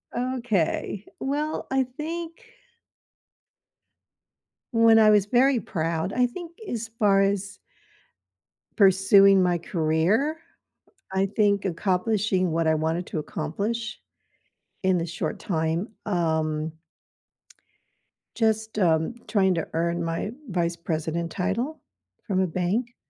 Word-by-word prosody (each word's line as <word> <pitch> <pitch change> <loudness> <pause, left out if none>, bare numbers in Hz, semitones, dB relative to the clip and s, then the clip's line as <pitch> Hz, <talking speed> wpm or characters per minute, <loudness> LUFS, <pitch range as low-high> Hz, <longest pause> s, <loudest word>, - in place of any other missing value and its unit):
Okay. 235 -6 -1
Well, 295 +3 -2
I 265 0 +3
think 320 +6 -5 2.4
when 230 -1 +6
I 215 -1 +6
was 205 -2 +4
very 250 +3 +3
proud, 165 0 -2
I 250 0 +3
think 340 +6 -9
as 230 -1 -4
far 200 -3 +4
as 200 0 -1 1.2
pursuing 195 0 +6
my 180 -1 +2
career, 170 - +1 0.8
I 190 +1 +2
think 205 0 +1
accomplishing 190 0 0
what 165 0 +1
I 160 - +3
wanted 160 +3 -1
to - - -3
accomplish 205 +10 -4 0.8
in 190 -1 +3
the 165 - -1
short 170 0 -4
time, 165 +3 -1 0.2
um 160 -4 0 1.6
just, 220 -1 0
um, 165 +3 +2
trying 195 -3 +3
to 165 - -2
earn 170 +1 0
my 165 +5 -2 0.2
Vice 170 -2 0
President 165 0 -3
title 230 +12 -2 0.5
from 190 -4 0
a 190 - +2
bank, 190 +8 -2
195 Hz, 110 wpm, -25 LUFS, 170-225 Hz, 2.4 s, when